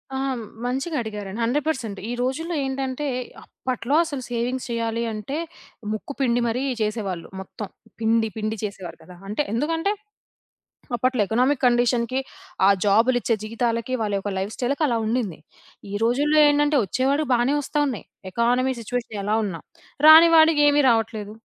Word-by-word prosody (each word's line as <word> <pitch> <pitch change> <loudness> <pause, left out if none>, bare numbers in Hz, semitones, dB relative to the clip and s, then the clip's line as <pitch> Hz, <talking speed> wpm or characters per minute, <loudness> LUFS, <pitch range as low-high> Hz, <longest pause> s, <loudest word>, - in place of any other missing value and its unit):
ఆ! - - -1 0.5
మంచిగా 270 +6 -2
అడిగారండి. 210 -2 -6
100% 250 -4 -1
ఈ - - -2
రోజుల్లో 320 +7 -2
ఏంటంటే, 265 +1 -3 0.4
అప్పట్లో 255 +2 -3
అసలు 285 -5 -5
సేవింగ్స్ 245 +2 -2
చేయాలి 230 0 -1
అంటే, 215 +8 -4 0.6
ముక్కు 215 +6 -5
పిండి 245 -2 +2
మరీ 235 +3 -1 0.2
చేసేవాళ్ళు. 210 -5 -2
మొత్తం 195 +2 -7 0.3
పిండి, 225 0 +2
పిండి 215 +1 -2
చేసేవారు 200 -4 -6
కదా! 180 +3 -13
అంటే 215 +8 0
ఎందుకంటే, 325 - 0 1.0
అప్పట్లో 250 0 +1
ఎకనామిక్ 255 +6 +1
కండిషన్‌కి, 245 +1 +2 0.5
ఆ - - +7 0.2
జాబులిచ్చే 230 +3 +3
జీవితాలకి, 230 +2 -2
వాళ్ళ 210 -2 -1
యొక్క 205 +1 -4
లైఫ్‌స్టైల్‌కి 245 +9 -2
అలా 235 - +1
ఉండింది. 220 -6 -2 0.5
ఈ - - -6
రోజుల్లో 290 +6 +3
ఏంటంటే, 290 0 +3
వచ్చేవాడికి 275 - 0
బాగానే 245 +4 +2
వస్తున్నాయి. 285 -4 -1 0.3
ఎకానమీ 245 +5 +1
సిట్యుయేషన్ 230 -2 -4
ఎలా 210 +2 +1
ఉన్నా. 170 -6 -5 0.5
రాని 320 +2 +10
వాడికి 315 -2 +6
ఏమి 290 0 +4
రావట్లేదు. 220 -2 -1
240 Hz, 135 wpm, -23 LUFS, 220-270 Hz, 1.0 s, రాని